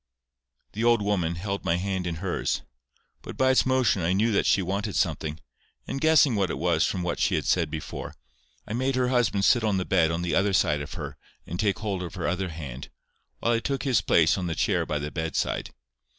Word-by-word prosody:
The 110 - -3
old 120 -2 +4
woman 90 -5 0
held 100 +3 -4
my 85 - +1
hand 95 0 -2
in 85 - -2
hers; 90 +2 -2 0.6
but - - -9
by 130 0 +4
its 130 - +3
motion 130 -7 +2
I 85 +2 +1
knew 110 +4 +2
that 100 - +2
she 95 - +3
wanted 100 +3 -2
something; 80 -2 -1 0.5
and 135 - -4
guessing 155 -4 +5
what 95 -3 +1
it - - -3
was - - +2
from 90 - -2
what 85 - -2
she - - +2
had - - -1
said 85 -4 +2
before, 75 -1 -6 0.5
I 105 - -4
made 130 +3 0
her 125 -1 +1
husband 120 -6 +2
sit 120 - +4
on 105 -3 +1
the 90 - -1
bed 85 -4 +3
on 85 +1 -2
the 85 -3 -1
other 100 +3 +2
side 75 -5 +2
of 70 - -7
her - - -6 0.3
and 85 - -6
take 105 -2 +1
hold 100 -4 -3
of 90 +2 -6
her 90 - -2
other 90 +1 -1
hand, 70 -5 -7 0.5
while 120 - +1
I 115 - +2
took 135 +2 -2
his 130 -8 +2
place 85 0 +3
on 90 - -3
the 85 - -2
chair 85 -4 0
by 75 - -1
the 75 +1 -4
bedside. 80 0 -2
95 Hz, 225 wpm, -26 LUFS, 85-110 Hz, 0.6 s, guessing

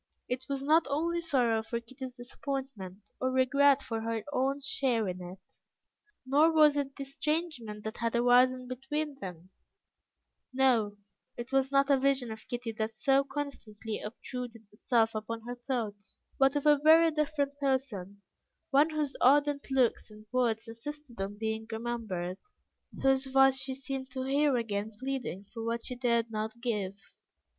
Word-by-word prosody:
It 255 +1 -3
was 275 -1 -2
not 310 +2 +4
only 335 +4 0
sorrow 245 -9 +2
for 230 +1 -3
Kitty's 255 +2 -9
disappointment, 245 -6 -6
or 260 - +1
regret 275 +2 +4
for 225 -2 -3
her 225 -1 -2
own 270 +2 +1
share 265 -5 0
in 180 0 -4
it, 185 +2 -11 0.7
nor 295 +5 +4
was 305 -2 +6
it 275 -1 -2
the 275 - -5
estrangement 275 -7 -3
that 220 +1 -5
had 230 0 -1
arisen 250 +1 +4
between 275 +3 -3
them; 180 -3 -8 1.0
no, 245 -6 +2 0.4
it 240 +2 -6
was 270 0 +2
not 275 0 +4
a 275 - +5
vision 265 -3 +1
of 220 0 -9
Kitty 245 -2 -3
that 220 +1 -1
so 270 +5 +3
constantly 270 -7 -5
obtruded 230 0 -7
itself 225 +1 +1
upon 220 +1 -4
her 245 +1 -5
thoughts, 235 -5 -5 0.2
but 270 +1 +4
of 290 - -1
a 295 -1 +6
very 320 +2 +6
different 290 -2 -1
person, 230 -8 -2 0.5
one 285 +3 +5
whose 300 -3 -2
ardent 285 +2 +4
looks 260 -4 +2
and 215 0 -14
words 235 -3 +1
insisted 240 0 -8
on 200 +1 -4
being 220 0 -3
remembered, 220 -6 -3 0.6
whose 270 0 +3
voice 270 0 +5
she 265 0 -3
seemed 270 0 -5
to 260 - -3
hear 280 +1 +2
again 215 -2 -2
pleading 255 -7 -4
for 225 -2 -5
what 230 0 -2
she - - -4
dared 235 -2 +1
not 220 +1 -4
give. 210 -6 -2
255 Hz, 155 wpm, -30 LUFS, 225-275 Hz, 1.0 s, was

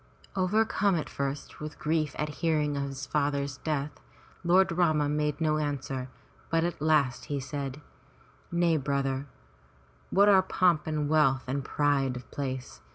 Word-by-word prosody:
Overcome 200 +1 +2
at 160 - -2
first 140 0 -4
with 150 0 -7
grief 155 -2 0
at 150 - -1
hearing 155 -3 +1
of 140 0 -1
his 135 0 -5
father's 140 -2 -1
death, 150 -1 -3 0.4
Lord 180 +2 +4
Rama 160 -4 +2
made 150 0 0
no 155 -1 +1
answer, 135 -3 -3 0.4
but 165 0 +2
at 170 -3 -2
last 150 -5 +2
he 145 -1 -2
said: 140 0 -5 0.7
"Nay, 170 -1 +3
brother, 140 -1 -1 0.8
what 200 +1 +5
are 195 -2 +7
pomp 180 -4 +2
and 155 -2 -1
wealth 145 -4 +3
and 135 +2 -2
pride 140 -2 +1
of 125 -2 -9
place? 130 -2 -5
150 Hz, 150 wpm, -29 LUFS, 140-160 Hz, 0.8 s, are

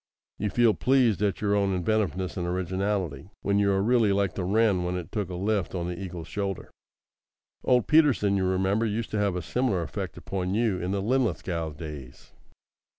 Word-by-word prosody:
You 105 - 0
feel 120 +1 +4
pleased 125 -7 +2
at 100 -2 0
your 100 -1 +1
own 100 -2 +2
inventiveness 95 -1 -1
and 90 -2 -2
originality, 95 -2 -2
when 100 0 +2
you 100 -1 +3
are 95 0 +1
really 115 -2 +3
like 100 -3 +1
the 95 - -3
wren 100 -1 +2
when 90 +1 -2
it 90 - -7
took 105 -5 -2
a 90 - -5
lift 100 0 -1
on 85 -1 -2
the 90 - -3
eagle's 90 -4 -6
shoulder. 100 +1 -4 0.9
Old 125 -2 +3
Peterson, 145 -11 +4
you 95 -1 +1
remember, 95 +4 +1
used 110 +2 -3
to 105 - -1
have 100 -3 +1
a 90 - -3
similar 100 - 0
effect 80 - -5
upon 95 0 -3
you 110 -5 +1
in 90 - -3
the 100 0 -1
Linlithgow 95 - -1
days. 75 -4 -9
100 Hz, 190 wpm, -27 LUFS, 90-105 Hz, 0.9 s, feel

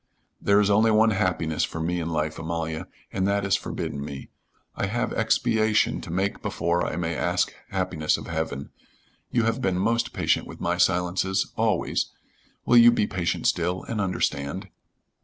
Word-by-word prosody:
"There 100 0 +4
is 105 0 +3
only 110 +3 +4
one 110 +1 +5
happiness 90 -6 0
for 80 - -3
me 85 +2 -1
in 85 -1 -3
life, 75 -1 -2
Amalia, 80 -1 -3 0.3
and 95 0 0
that 100 0 +1
is 95 - +3
forbidden 70 - -4
me. 70 -2 -8 0.4
I 95 - -1
have 120 +5 -1
expiation 110 -2 +2
to - - -9
make 95 +3 -1
before 85 +1 0
I - - -2
may 85 -1 -2
ask 90 +2 0 0.2
happiness 90 -5 0
of - - -8
heaven. 80 -4 -4 0.6
You 120 - +1
have 115 0 0
been 95 -1 +1
most 115 +4 +1
patient - - 0
with - - -10
my 85 +1 0
silences 90 +2 +1
always - - 0 0.6
will 120 - +5
you 120 0 +9
be 105 - +2
patient 90 -4 -2
still 90 +2 +1
and 110 -3 -3
understand?" 90 -1 -2
90 Hz, 170 wpm, -25 LUFS, 85-105 Hz, 0.6 s, you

